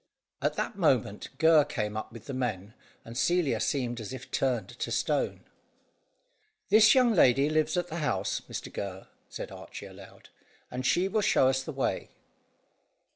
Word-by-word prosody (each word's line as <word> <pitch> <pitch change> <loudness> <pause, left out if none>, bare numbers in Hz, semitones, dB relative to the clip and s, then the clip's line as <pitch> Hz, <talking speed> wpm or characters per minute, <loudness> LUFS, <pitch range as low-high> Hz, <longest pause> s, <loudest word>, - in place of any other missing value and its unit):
At - - 0
that - - -3
moment, 125 - +1
Gurr 160 -2 +6
came 110 -8 -3
up 110 - -5
with 115 -1 -11
the 140 - -6
men, 110 -6 -3 0.3
and 115 - -9
Celia 175 +3 +1
seemed 120 -4 -1
as 110 - -7
if 130 0 -9
turned 125 -7 0
to - - -5
stone. - - -1 1.3
"This 215 +2 +7
young 250 -3 +5
lady 140 - +4
lives 155 +3 +1
at 175 0 -1
the 165 - -5
house, 100 - -1
Mr - - -6
Gurr," 95 -1 -5 0.2
said - - -7
Archy - - -9
aloud, - - -14 0.4
"and 125 +1 -4
she 180 +2 +2
will 210 +2 0
show 130 -9 +4
us 130 0 +1
the 145 - -6
way." 135 -2 -2
130 Hz, 165 wpm, -29 LUFS, 115-165 Hz, 1.3 s, This